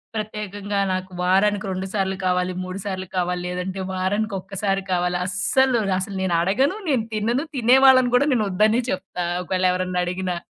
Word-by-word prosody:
ప్రత్యేకంగా 205 Hz, -2 st, -4 dB
నాకు 185 Hz, 0 st, -3 dB
వారానికి 195 Hz, +3 st, +2 dB
2 185 Hz, +1 st, -3 dB
సార్లు 190 Hz, -2 st, 0 dB
కావాలి, 180 Hz, 0 st, +1 dB
3 185 Hz, +1 st, -6 dB
సార్లు 190 Hz, -2 st, -4 dB
కావాలి 180 Hz, 0 st, 0 dB
లేదంటే, 180 Hz, +2 st, -4 dB
వారానికి 200 Hz, +3 st, -1 dB
ఒక్కసారి 195 Hz, 0 st, -2 dB
కావాలి 180 Hz, 0 st, +1 dB
అస్సలు, 225 Hz, +6 st, +2 dB, 0.2 s
అసలు 195 Hz, +1 st, -5 dB
నేను 175 Hz, -2 st, +1 dB
అడగను. 260 Hz, -, +1 dB
నేను 250 Hz, -6 st, +1 dB
తినను. 235 Hz, +8 st, 0 dB
తినేవాళ్ళని 255 Hz, +1 st, +5 dB
గూడా 285 Hz, +4 st, +3 dB
నేనొద్దనే 215 Hz, +2 st, +2 dB
చెప్తా. 185 Hz, -1 st, -4 dB, 0.2 s
ఒకవేళ 185 Hz, +1 st, -1 dB
ఎవరన్నా 185 Hz, 0 st, -1 dB
అడిగినా. 180 Hz, 0 st, -2 dB
195 Hz, 150 wpm, -22 LUFS, 185-215 Hz, 0.2 s, తినేవాళ్ళని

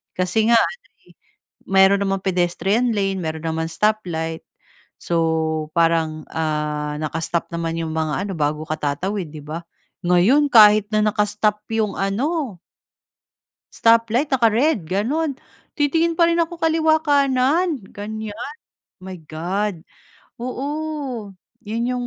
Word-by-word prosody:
Kasi 185 Hz, +4 st, +1 dB
nga 230 Hz, -, +7 dB
ano, 485 Hz, -, -2 dB, 0.2 s
eh, -, -, -18 dB, 0.6 s
meron 195 Hz, +1 st, +5 dB
namang 195 Hz, -1 st, -1 dB
pedestrian 190 Hz, +6 st, +1 dB
lane, 195 Hz, -1 st, 0 dB
meron 160 Hz, -2 st, -4 dB
naman 160 Hz, 0 st, -2 dB
stop 215 Hz, +3 st, +1 dB
light. 160 Hz, -1 st, -4 dB, 0.6 s
So 160 Hz, -2 st, 0 dB
parang 165 Hz, -2 st, +1 dB
ah, 150 Hz, -1 st, -2 dB
naka-stop 165 Hz, +2 st, -2 dB
naman 165 Hz, 0 st, -2 dB
'yong 160 Hz, -1 st, -3 dB
mga 155 Hz, -1 st, -1 dB
ano, 195 Hz, -, -4 dB
bago 150 Hz, 0 st, -1 dB
ka 155 Hz, -, -1 dB
tatawid, 175 Hz, +5 st, -2 dB
di 155 Hz, -, -9 dB
ba? 160 Hz, +3 st, -5 dB, 0.4 s
Ngayon 210 Hz, +12 st, +4 dB
kahit 210 Hz, -2 st, +7 dB
na 215 Hz, -, +3 dB
naka-stop 210 Hz, 0 st, +1 dB
'yong 220 Hz, -2 st, 0 dB
ano, 240 Hz, -, -1 dB, 1.2 s
stoplight, 230 Hz, +5 st, +3 dB
naka-red 235 Hz, -, +2 dB
ganun. 260 Hz, -, -1 dB, 0.4 s
Titingin 325 Hz, +3 st, +2 dB
pa 335 Hz, -, +6 dB
rin 335 Hz, -, +2 dB
ako 335 Hz, 0 st, -3 dB
kaliwa 320 Hz, -1 st, +3 dB
kanan 285 Hz, +2 st, +2 dB
gan'yan. 215 Hz, -, -6 dB, 0.5 s
My 185 Hz, -1 st, -8 dB
God. 170 Hz, +4 st, -3 dB, 0.6 s
Oo. 270 Hz, -4 st, -4 dB, 0.3 s
'Yon 225 Hz, +3 st, -3 dB
yung 245 Hz, 0 st, -3 dB
205 Hz, 125 wpm, -21 LUFS, 165-250 Hz, 1.2 s, nga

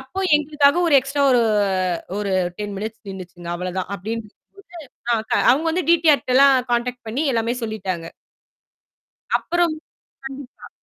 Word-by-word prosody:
அப்போ 265 Hz, +9 st, -9 dB, 0.2 s
எங்களுக்காக 295 Hz, 0 st, +2 dB
ஒரு 295 Hz, -, +3 dB
எக்ஸ்ட்ரா 275 Hz, +2 st, -2 dB
ஓ -, -, +4 dB, 0.9 s
ஒரு 200 Hz, -2 st, -2 dB, 0.3 s
10 205 Hz, -1 st, -4 dB
மினிட்ஸ் 220 Hz, +2 st, -6 dB
நின்னுச்சிங்க 180 Hz, -2 st, -9 dB
அவ்வளவு 180 Hz, +1 st, -5 dB
தான் 185 Hz, -, -3 dB
அப்படின்னு 220 Hz, +4 st, -5 dB, 0.7 s
சொல்லிட்டு 225 Hz, -2 st, -1 dB
அவங்க 300 Hz, +6 st, +1 dB
வந்து 360 Hz, +2 st, -1 dB
டிடிஆர் 320 Hz, -4 st, +4 dB
கிட்ட 255 Hz, -, -1 dB
எல்லாம் 275 Hz, -1 st, +7 dB, 0.2 s
கான்டாக்ட் 245 Hz, 0 st, -1 dB
பண்ணி 270 Hz, +8 st, -1 dB
எல்லாமே 230 Hz, +1 st, 0 dB
சொல்லிட்டாங்க. 190 Hz, -6 st, -4 dB, 1.3 s
அப்புறம் 345 Hz, -2 st, 0 dB, 0.5 s
கண்டிப்பா. 270 Hz, -1 st, -10 dB
240 Hz, 135 wpm, -21 LUFS, 205-285 Hz, 1.3 s, எல்லாம்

